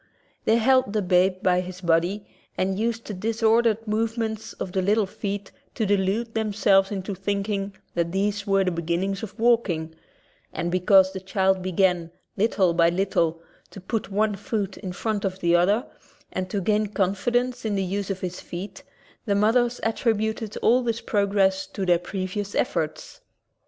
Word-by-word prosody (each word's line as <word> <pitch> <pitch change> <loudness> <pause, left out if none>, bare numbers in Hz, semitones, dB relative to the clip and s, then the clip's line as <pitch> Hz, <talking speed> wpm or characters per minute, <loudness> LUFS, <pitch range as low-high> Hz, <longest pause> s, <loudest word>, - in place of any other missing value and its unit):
They 220 - +4
held 255 -2 +3
the 210 -2 0
babe 185 +1 +2
by 180 -1 +3
his 185 0 -8
body 175 +4 +1 0.3
and 190 +1 0
used 230 +1 -1
the 210 - -5
dis 225 +4 -3
ordered 225 0 +3
movements 220 0 -2
of 185 - -6
the 190 - 0
little 210 +3 +2
feet 200 0 -5 0.2
to 220 - 0
delude 205 +3 0
themselves 200 -3 +3
into 195 0 -3
thinking 200 +1 -2 0.2
that 170 -1 -1
these 200 +2 -1
were 195 -1 +3
the 185 - 0
beginnings 170 +4 -2
of 210 -1 -8
walking, 205 -9 +2 0.6
and 175 - -3
because 190 +1 +4
the 190 - -4
child 190 0 +1
began, 180 -2 +1 0.3
little 195 -4 +2
by 170 0 +4
little, 170 -3 0 0.3
to - - -10
put 210 +3 -3
one 210 +2 +1
foot 200 -1 -3
in 190 -3 -6
front 210 +2 -2
of 190 -2 -2
the 175 -2 +2
other 200 +7 +3 0.5
and 185 0 -3
to 200 0 -2
gain 210 +2 +1
confidence 240 +6 0
in 215 -2 -1
the 195 - 0
use 195 +2 -3
of 190 -1 -3
his 180 -1 -4
feet, 180 +4 -7 0.5
the 200 - +2
mothers 235 +4 +2
attributed 220 -1 -1
all 245 +3 +5
this 230 -2 -1
pro 205 -2 +1
gress 195 -1 +2
to 195 0 -4
their 175 -2 +4
previous 195 +2 -4
efforts. - - -2
195 Hz, 170 wpm, -25 LUFS, 185-220 Hz, 0.6 s, all